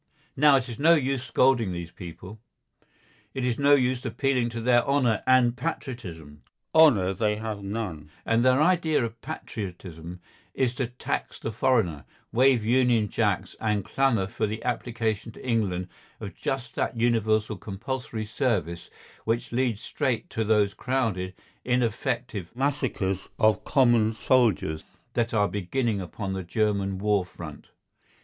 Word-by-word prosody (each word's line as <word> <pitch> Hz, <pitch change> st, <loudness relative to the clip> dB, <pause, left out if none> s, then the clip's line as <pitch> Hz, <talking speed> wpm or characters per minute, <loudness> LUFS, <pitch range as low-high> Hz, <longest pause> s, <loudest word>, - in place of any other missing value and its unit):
Now 145 Hz, 0 st, +6 dB
it 130 Hz, -1 st, +1 dB
is 120 Hz, -3 st, -7 dB
no 165 Hz, +3 st, +6 dB
use 135 Hz, -4 st, 0 dB
scolding 125 Hz, -6 st, +2 dB
these 85 Hz, -1 st, -6 dB
people. 90 Hz, +4 st, -10 dB, 1.0 s
It 130 Hz, -2 st, -1 dB
is 125 Hz, 0 st, -1 dB
no 140 Hz, 0 st, +6 dB
use 130 Hz, -2 st, 0 dB
appealing 130 Hz, -4 st, 0 dB
to 115 Hz, 0 st, -5 dB
their 120 Hz, +1 st, +4 dB
honour 130 Hz, -6 st, +2 dB
and 125 Hz, -2 st, +4 dB
patriotism. 105 Hz, -, -6 dB, 0.3 s
Honour 120 Hz, -13 st, +5 dB
they 105 Hz, +1 st, 0 dB
have 110 Hz, -1 st, -5 dB
none, 100 Hz, -7 st, -5 dB, 0.2 s
and 115 Hz, +1 st, +2 dB
their 130 Hz, +1 st, +4 dB
idea 160 Hz, -5 st, +3 dB
of 115 Hz, 0 st, -8 dB
patriotism 90 Hz, -4 st, -7 dB, 0.4 s
is 125 Hz, -2 st, +1 dB
to 125 Hz, -1 st, -2 dB
"tax 125 Hz, +1 st, -4 dB
the 110 Hz, -, -4 dB
foreigner," 110 Hz, -, +1 dB, 0.3 s
wave 125 Hz, -2 st, +4 dB
Union 120 Hz, -3 st, +3 dB
Jacks, -, -, 0 dB
and 105 Hz, -3 st, 0 dB
clamour 115 Hz, -3 st, +1 dB
for 105 Hz, +3 st, -2 dB
the 110 Hz, +2 st, -5 dB
application 115 Hz, -3 st, -2 dB
to -, -, -11 dB
England 95 Hz, -7 st, 0 dB, 0.3 s
of -, -, -7 dB
just 130 Hz, -3 st, -4 dB
that 120 Hz, -, -2 dB
universal 110 Hz, -2 st, +1 dB
compulsory 110 Hz, +3 st, -5 dB
service 105 Hz, -, -1 dB, 0.3 s
which 115 Hz, +1 st, -1 dB
leads 120 Hz, -3 st, 0 dB
straight 125 Hz, -6 st, -2 dB
to 110 Hz, -, -1 dB
those 105 Hz, -2 st, +2 dB
crowded, 110 Hz, -9 st, -1 dB, 0.3 s
ineffective 120 Hz, -4 st, -1 dB
massacres 125 Hz, -9 st, -1 dB
of 110 Hz, -2 st, +3 dB
common 120 Hz, -5 st, +3 dB
soldiers 110 Hz, -9 st, +2 dB, 0.3 s
that 120 Hz, -1 st, 0 dB
are 105 Hz, -2 st, +2 dB
beginning 105 Hz, +3 st, -1 dB
upon 95 Hz, +3 st, -5 dB
the 95 Hz, -, -3 dB
German 100 Hz, +1 st, 0 dB
war 105 Hz, -1 st, +2 dB
front. 85 Hz, -4 st, -10 dB
115 Hz, 140 wpm, -26 LUFS, 100-130 Hz, 1.0 s, Now